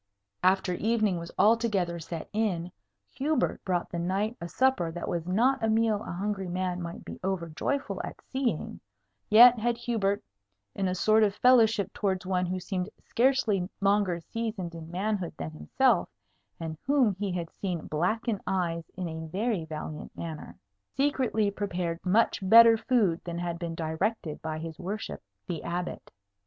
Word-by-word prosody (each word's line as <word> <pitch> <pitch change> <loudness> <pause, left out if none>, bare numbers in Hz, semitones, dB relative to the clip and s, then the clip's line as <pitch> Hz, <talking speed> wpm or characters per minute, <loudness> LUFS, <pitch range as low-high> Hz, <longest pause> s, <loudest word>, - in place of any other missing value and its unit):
After 185 0 +3
evening 215 -2 +1
was 170 0 -8
altogether 205 -5 +2
set 165 0 -6
in, 185 -5 -1 0.4
Hubert 285 -1 0
brought 180 -2 -1
the 170 - -3
knight 195 +6 -1
a 170 - -4
supper 220 -6 +2
that 175 +1 -5
was 170 -1 -2
not 240 +7 +2
a 225 - +2
meal 220 -1 +2
a - - -6
hungry 195 +1 -2
man 180 0 -2
might 170 0 -7
be - - -8
over 185 -3 -2
joyful 280 - -2
at - - -7
seeing; 260 - -2 0.5
yet 240 +2 +9
had 235 +1 0
Hubert 210 -4 -1 0.5
(in 195 - -1
a 185 - -1
sort 215 +4 +4
of 205 -2 +3
fellowship 225 -5 +4
towards 190 -3 -1
one 180 -1 0
who 185 +1 -2
seemed 185 +1 -3
scarcely 230 -7 +1
longer 195 -3 +2
seasoned 210 -2 -4
in 165 -1 -8
manhood 190 0 -2
than 80 0 -5
himself, 75 0 +1 0.5
and 160 -2 -5
whom 270 -7 +4
he 205 -2 -1
had 170 -2 -4
seen 180 -5 -4
blacken 200 +7 -1
eyes 170 -3 -1
in 185 -2 -3
a 160 0 -6
very 195 0 -1
valiant 155 -1 -7
manner) 160 -2 -7 0.4
secretly 255 -7 +1
prepared 180 -4 -3
much 210 +5 +3
better 230 +4 +8
food 220 -8 +1
than 170 -1 -5
had 170 -1 -3
been 170 -1 -4
directed 160 +1 -2
by 160 -1 -3
his 160 0 -7
worship 200 +4 -5 0.2
the 165 -3 -4
Abbot. 175 +1 -4
190 Hz, 160 wpm, -28 LUFS, 170-220 Hz, 0.5 s, yet